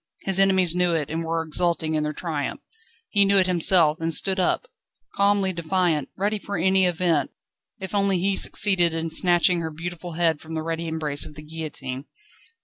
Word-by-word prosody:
His 195 -1 +3
enemies 190 -3 +3
knew 180 -1 +1
it, 150 -2 -3
and 165 +1 -3
were 165 0 -2
exulting 165 0 -1
in 155 - 0
their 150 0 -2
triumph. 150 -2 -4 0.5
He 205 -2 +3
knew 200 0 +3
it 190 - +4
himself, 170 -2 +3
and 165 0 -1
stood 190 +4 +2
up, 185 - 0 0.5
calmly 200 -1 +2
defiant, 170 -4 -1
ready 205 +2 -1
for 200 -1 -5
any 190 +2 +3
event, 170 -5 0 0.5
if 190 0 -7
only 200 -2 +2
he 195 +2 0
succeeded 180 -5 +2
in 165 0 -3
snatching 175 0 +3
her 165 -1 -4
beautiful 170 +2 -7
head 165 -2 0
from 160 0 -8
the 160 - -3
ready 165 +1 -4
embrace 155 -3 -2
of 150 - -10
the 150 - -10
guillotine. 150 -4 -6
170 Hz, 185 wpm, -23 LUFS, 160-190 Hz, 0.5 s, it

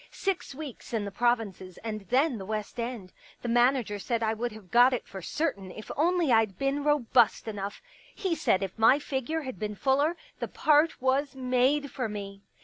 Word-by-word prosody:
" - - -27 0.2
Six 355 -7 -3
weeks 280 -5 -8
in 210 -2 -1
the 200 - -5
provinces 200 -5 -1
and 215 -2 -4
then 265 -1 +2
the 190 - -6
West 215 +2 -4
End. 230 -6 -5 0.3
The - - -3
manager 240 -3 +2
said 230 +3 -1
I 220 0 +1
would 235 +2 -3
have 210 -4 -13
got 245 +2 +6
it 250 - -2
for 190 - -8
certain 200 - -2
if 215 +4 -9
only 340 -1 +2
I'd 220 -5 +3
been 275 +3 0
robust 255 -7 +3
enough. 205 - -5 0.3
He 380 -4 -1
said 205 - +1
if 195 +3 -6
my 225 +5 +6
figure 295 +2 -2
had 260 -8 -7
been 210 0 -3
fuller, 285 - +2 0.2
the - - -2
part 305 +1 +3
was 270 +1 +1
made 260 +3 +1
for 250 -5 -3
me." 200 -1 -7
245 Hz, 195 wpm, -28 LUFS, 210-280 Hz, 0.3 s, got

